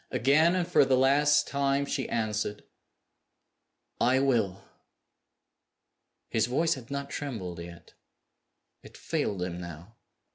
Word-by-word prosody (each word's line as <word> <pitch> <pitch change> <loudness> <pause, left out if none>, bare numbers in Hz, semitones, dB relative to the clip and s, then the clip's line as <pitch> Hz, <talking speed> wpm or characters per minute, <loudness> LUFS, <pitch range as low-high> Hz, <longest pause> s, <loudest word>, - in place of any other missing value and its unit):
Again, 140 +8 +3
and 180 -2 0
for 180 - +5
the 130 -1 +2
last 145 +3 +4
time, 140 0 0
she - - -3
answered, 105 -2 -2 1.4
"I 125 +2 +3
will!" 115 -9 +1 1.7
His 110 0 +1
voice 160 +7 +1
had 130 -5 -10
not 140 0 -5
trembled 95 - -5
yet. 85 -1 -11 0.9
It - - -14
failed 95 -4 -2
him 90 -1 -4
now. 85 +6 -10
125 Hz, 115 wpm, -28 LUFS, 100-140 Hz, 1.7 s, for